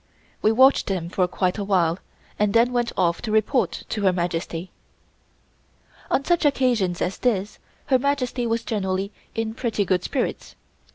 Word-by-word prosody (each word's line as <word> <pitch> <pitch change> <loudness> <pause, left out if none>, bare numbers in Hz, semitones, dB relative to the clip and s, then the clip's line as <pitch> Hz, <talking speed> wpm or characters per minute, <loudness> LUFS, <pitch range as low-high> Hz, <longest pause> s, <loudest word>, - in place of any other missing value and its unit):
We 215 - +4
watched 260 +4 +5
them 180 -4 -2
for 180 0 +1
quite 180 +2 -1
a - - -1
while 180 -3 +1 0.4
and 210 0 +1
then 240 +2 +4
went 240 -1 0
off 170 -2 +1
to 220 - -4
report 220 +5 +1
to 215 - -2
Her 190 -2 +4
Majesty. 175 0 -3 1.4
On 275 - +1
such 345 -1 +2
occasions 245 - +1
as 185 - -3
this 210 -4 -1 0.3
Her 260 -3 +3
Majesty 255 -3 -1
was 230 0 -1
generally 195 -2 -2 0.2
in 225 0 -2
pretty 225 -4 -1
good 180 -1 +1
spirits. 260 +4 -3
210 Hz, 160 wpm, -23 LUFS, 185-245 Hz, 1.4 s, watched